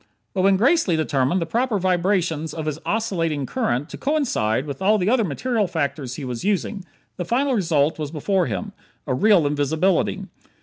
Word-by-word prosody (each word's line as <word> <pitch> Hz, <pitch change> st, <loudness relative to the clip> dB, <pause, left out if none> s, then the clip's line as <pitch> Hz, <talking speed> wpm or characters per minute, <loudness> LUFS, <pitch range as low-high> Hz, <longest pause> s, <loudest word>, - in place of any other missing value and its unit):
But 190 Hz, -, 0 dB
when 195 Hz, 0 st, +4 dB
Gracely 245 Hz, -, +3 dB
determined 145 Hz, +2 st, +1 dB
the -, -, -4 dB
proper 235 Hz, +5 st, 0 dB
vibrations 175 Hz, -4 st, 0 dB
of 160 Hz, -2 st, -4 dB
his 155 Hz, 0 st, -3 dB
oscillating 165 Hz, -10 st, -1 dB
current 145 Hz, -, -1 dB
to -, -, -9 dB
coincide 235 Hz, -, 0 dB
with 145 Hz, +4 st, -6 dB
all 210 Hz, +3 st, +4 dB
the 195 Hz, +2 st, +1 dB
other 250 Hz, -3 st, +3 dB
material 210 Hz, -, -1 dB
factors 140 Hz, -6 st, -3 dB
he 145 Hz, -, -6 dB
was 125 Hz, +1 st, -5 dB
using, 200 Hz, 0 st, -1 dB, 0.3 s
the 180 Hz, -, -2 dB
final 260 Hz, +9 st, +1 dB
result 160 Hz, -, +1 dB
was 150 Hz, -2 st, -3 dB
before 175 Hz, +4 st, 0 dB
him 210 Hz, -3 st, -4 dB, 0.3 s
real 170 Hz, +6 st, +3 dB
invisibility. 150 Hz, +5 st, +1 dB
175 Hz, 170 wpm, -22 LUFS, 150-210 Hz, 0.3 s, when